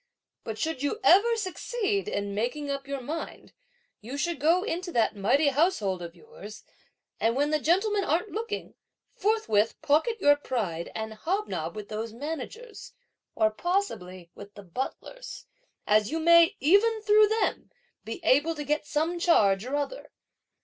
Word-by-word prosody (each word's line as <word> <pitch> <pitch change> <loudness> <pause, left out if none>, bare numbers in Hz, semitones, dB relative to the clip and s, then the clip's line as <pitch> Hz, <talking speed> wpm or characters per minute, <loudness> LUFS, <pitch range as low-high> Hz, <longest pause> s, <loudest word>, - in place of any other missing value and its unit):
But 220 -1 -5
should 320 -1 -2
you 290 +10 -1
ever 405 +6 +5
succeed 410 0 -2
in 200 - -3
making 265 +7 -2
up 275 0 -5
your 280 -1 -4
mind, 310 +6 -7 0.5
you 250 +6 -7
should 340 +3 -2
go 335 +5 +3
into 360 -3 -3
that 225 -2 +2
mighty 275 +9 +3
household 260 - +1
of 170 0 -8
yours, 205 +4 -12 0.6
and 230 +1 +1
when 290 +2 +1
the 305 - +2
gentlemen 395 +7 +1
aren't 355 +5 0
looking, 455 +2 -5 0.4
forthwith 395 - +1
pocket 320 +11 +2
your 290 -4 +5
pride 205 - -3
and 220 0 -4
hobnob 370 - -3
with 210 -1 -7
those 220 +1 -5
managers, 320 - -7 0.4
or 215 -1 +3
possibly 185 - -3
with 200 0 -12
the 205 - -11
butlers, 265 - -7 0.4
as 210 0 +3
you 325 - -2
may, 335 +4 +6
even 425 +8 +3
through 425 0 +6
them, 440 +1 -1 0.3
be - - -6
able 320 +2 +3
to 300 - -5
get 300 +1 -1
some 325 +4 -1
charge 205 - +3
or 265 +3 -3
other! 290 +13 -4
300 Hz, 155 wpm, -27 LUFS, -, 0.6 s, may